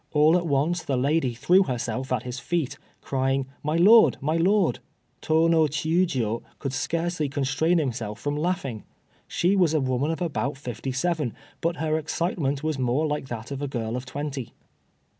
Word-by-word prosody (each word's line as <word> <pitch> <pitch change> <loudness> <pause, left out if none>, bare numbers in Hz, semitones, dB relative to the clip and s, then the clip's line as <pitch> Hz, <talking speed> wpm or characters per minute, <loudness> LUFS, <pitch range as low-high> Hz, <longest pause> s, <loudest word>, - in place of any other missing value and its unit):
All 155 +2 +5
at 175 -1 +1
once 155 +5 +1
the 135 -4 -1
lady 135 -1 +1
threw 175 +11 +4
herself 125 - -2
at 125 -3 0
his 125 +1 -5
feet, 165 -3 -2 0.2
crying, 135 0 0 0.2
"My 150 +2 -1
lord! 215 +7 +7
my 155 +4 0
lord!" 185 +2 +2 0.4
Tô 160 +1 +3
no 165 -1 +4
Chiûjiô 150 - 0 0.2
could 135 -3 -4
scarcely 165 +1 -1
constrain 145 +5 +1
himself 115 -8 -2
from 145 +4 -2
laughing. 150 - -2 0.4
She 180 +3 +1
was 175 -5 +3
a - - +3
woman 130 +2 0
of 165 - -2
about 150 -5 -2
fifty 125 -1 -5
seven, 150 -1 -1 0.3
but 170 +1 0
her 155 0 0
excitement 155 -3 -2
was 155 -3 -1
more 130 +5 +1
like 150 -3 -2
that 120 0 -6
of 140 0 -4
a 145 - -1
girl 115 -3 -3
of 125 0 -5
twenty. 140 -3 -5
145 Hz, 175 wpm, -25 LUFS, 130-165 Hz, 0.4 s, lord